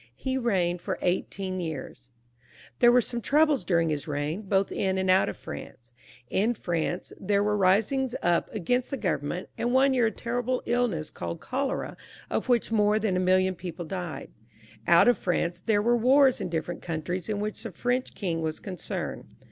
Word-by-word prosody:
Ho 260 0 +1
reigned 180 -7 0
for - - -3
eighteen 185 +1 -1
j 175 - -2
ears, 135 -4 -7 0.7
TlK\n> 240 - +7
were 250 0 +5
some 240 +1 -4
troubles 300 +1 +3
during 165 -3 +2
his 150 +1 -3
reign, 150 +5 -2
both 195 -1 0
in 190 -1 0
and 190 0 +2
out 185 - +4
of - - -6
Fmnoe« 120 0 -9 0.4
In 220 - +1
France 175 -2 -2
there 200 +1 +1
were 210 0 +1
risings 220 +7 +2
np 175 -1 +2
against 245 +5 0
Uio 275 - -3
go>*orument, 160 +3 -2
and 240 +1 0
one 270 +1 +5
year 245 -3 +3
a - - -1
terrible 245 +2 -2
iUness, 235 -11 0
called 170 - -5
oholom> 270 +1 -2 0.4
of - - -1
wluoli 240 -3 +2
moi>^ 210 -1 +3
than 210 -4 0
a - - +1
million 185 +1 +3
people 175 -1 -7
died. 175 -1 -5 0.6
Out 170 +6 +6
of 245 - +3
Fruuv 175 -1 0
there 205 -2 +3
wore 240 +2 +3
wars 265 +2 +4
in - - -3
diflterent 170 +1 -3
countries 175 +3 -4
in 210 -1 -1
which 210 +1 -3
the 225 - -5
Fit>noh 245 +7 -1
king 170 -5 -2
was 160 -1 -3
concerned. 185 -5 -5
195 Hz, 185 wpm, -27 LUFS, 175-240 Hz, 0.7 s, TlK\n>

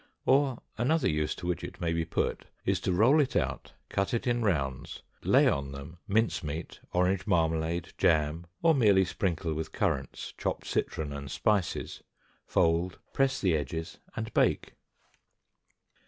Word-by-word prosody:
Or, 135 -2 +3 0.2
another 145 +5 +2
use 75 0 0
to - - -8
which 90 -2 -1
it - - -7
may 85 -1 0
be 85 0 0
put 85 - -1 0.2
is - - +2
to - - -1
roll 120 - +5
it 140 - -1
out, - - -1
cut 100 +4 0
it 115 - -2
in 120 -1 +1
rounds, 70 - -1 0.2
lay - - +5
on 70 0 0
them 70 +5 -9
mince 110 0 +1
meat, 75 +2 -5
orange 90 +3 +1
marmalade, 80 -2 0
jam, 80 +1 +2 0.2
or 165 -1 +6
merely 105 -8 +5
sprinkle 85 -3 -1
with 80 +1 -4
currants, - - -2
chopped - - -2
citron, 75 -2 -2
and 70 -1 -6
spices, 100 - 0 0.5
fold, 85 +2 +2 0.2
press 135 0 +2
the 90 -5 +2
edges, 80 +2 -4 0.2
and 110 0 -4
bake. - - +2
90 Hz, 155 wpm, -29 LUFS, 80-110 Hz, 0.5 s, or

